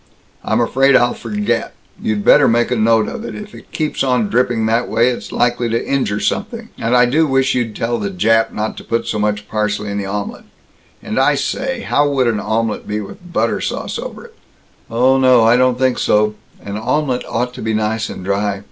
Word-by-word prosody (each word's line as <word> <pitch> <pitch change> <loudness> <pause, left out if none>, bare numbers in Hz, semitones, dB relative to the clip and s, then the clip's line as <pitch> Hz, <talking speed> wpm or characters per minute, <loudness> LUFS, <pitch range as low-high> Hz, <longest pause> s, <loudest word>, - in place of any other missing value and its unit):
"I'm 110 - 0
afraid 135 +3 +3
I'll 120 -1 +4
forget. 105 -3 -2 0.3
You 110 - 0
better 135 +7 +5
make 120 +1 +2
a - - +2
note 110 -1 +3
of 235 -2 -6
it. - - -6
If 210 0 -9
it - - -14
keeps 155 -3 -2
on 125 -5 +1
dripping 120 -2 +1
that 115 +2 +1
way, 120 +2 +3
it's 125 - -5
likely 120 -1 0
to 115 +1 -1
injure 130 -7 0
something. 225 - -3
And 115 +2 +2
I 125 - +6
do 155 +6 +2
wish 135 -1 +2
you'd 115 -4 -2
tell 120 +1 -1
the 100 -1 -2
Jap 110 +4 +2
not 110 +1 -3
to - - -8
put 115 - -2
so 105 - -2
much 105 0 -1
parsley 105 -1 -2
in 100 - -2
the 100 - -4
omelet. 100 +1 -5 0.6
And 110 - -2
I 145 +2 +4
say, 260 - -2
how 145 -7 +1
would 135 -2 +1
an 115 -3 +1
omelet 110 0 -2
be 105 0 -2
with 105 - -9
a 175 - -15
butter 175 - 0
sauce - - -3
over - - -7
it?" 470 - -16 0.6
"Oh, 130 +3 +3
no, 130 -3 +5
I 115 +2 +5
don't 125 0 +3
think 130 -1 +1
so. 105 0 +2 0.3
An 100 0 -6
omelet 130 +3 -1
ought 125 +2 -2
to - - -9
be 110 0 -1
nice 110 +1 -1
and 90 - -8
dry. 100 0 -1
115 Hz, 220 wpm, -17 LUFS, 105-130 Hz, 0.6 s, I